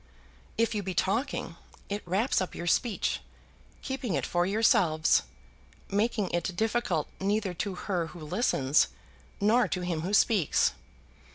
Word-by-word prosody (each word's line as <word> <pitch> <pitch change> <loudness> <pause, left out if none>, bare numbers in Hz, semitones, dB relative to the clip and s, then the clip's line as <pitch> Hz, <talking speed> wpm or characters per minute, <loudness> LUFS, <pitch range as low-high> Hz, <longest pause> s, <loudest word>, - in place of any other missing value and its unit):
If 230 0 +2
you 210 - -1
be 190 -2 -4
talking, 200 - -1 0.3
it 205 +1 -3
wraps 200 +8 +1
up 185 - -4
your 170 - -5
speech, 215 +5 +1 0.6
keeping 260 - -2
it - - -1
for 175 0 +1
yourselves, 185 -6 +3 0.7
making 210 -1 0
it 175 +1 -1
difficult 220 -7 0
neither 200 -1 0
to 190 +2 -3
her 180 -3 -2
who 175 0 -11
listens 150 - +2 0.5
nor 225 +4 +4
to 180 - -2
him 175 -3 -2
who 190 +5 0
speaks. 205 -8 +3
195 Hz, 135 wpm, -29 LUFS, 175-220 Hz, 0.7 s, nor